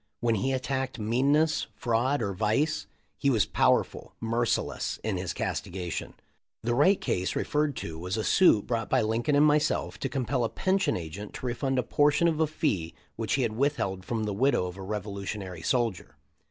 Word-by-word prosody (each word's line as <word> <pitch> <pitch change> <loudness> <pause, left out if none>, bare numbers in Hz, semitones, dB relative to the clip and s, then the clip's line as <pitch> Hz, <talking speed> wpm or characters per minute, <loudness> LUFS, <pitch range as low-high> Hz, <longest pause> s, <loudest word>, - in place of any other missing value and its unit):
WTien 115 -2 +2
he 130 +7 0
attacked 130 0 -2
meanness, 140 +8 +2
fraud, 120 +4 +1
or 100 -1 -1
vice, 110 - 0 0.3
he 140 - +2
was 110 -8 +3
powerful, - - +1
merciless 115 +1 -1
in 110 -3 -1
his 90 0 -3
castigation." 90 -2 -4 0.5
The 120 +1 0
Wright 165 +10 +4
case 90 0 -1
referred 150 -2 0
to 80 -5 -6
was 90 +4 -3
a 110 - -1
suit 145 - +5
brought 115 -2 -2
by - - +3
Lincoln 115 +6 +1
and 145 +1 +6
myself 150 0 +1
to - - -2
compel 130 -2 -1
a 115 - 0
pension 190 - +1
agent 90 +5 -7
to - - -7
refund 130 +2 -1
a 125 - +2
por 145 0 +3
tion 150 +4 +2
of 160 -2 0
a 160 - +3
fee 105 - -1 0.2
which 115 -1 -2
he 135 - +1
had 115 -2 -1
withheld 110 -8 0
from 110 +2 -2
the 105 -1 -2
widow 125 -2 +2
of 90 0 -6
a 95 - -9
revolutionary 100 -2 -5
soldier. 105 - -1
115 Hz, 185 wpm, -28 LUFS, 100-140 Hz, 0.5 s, and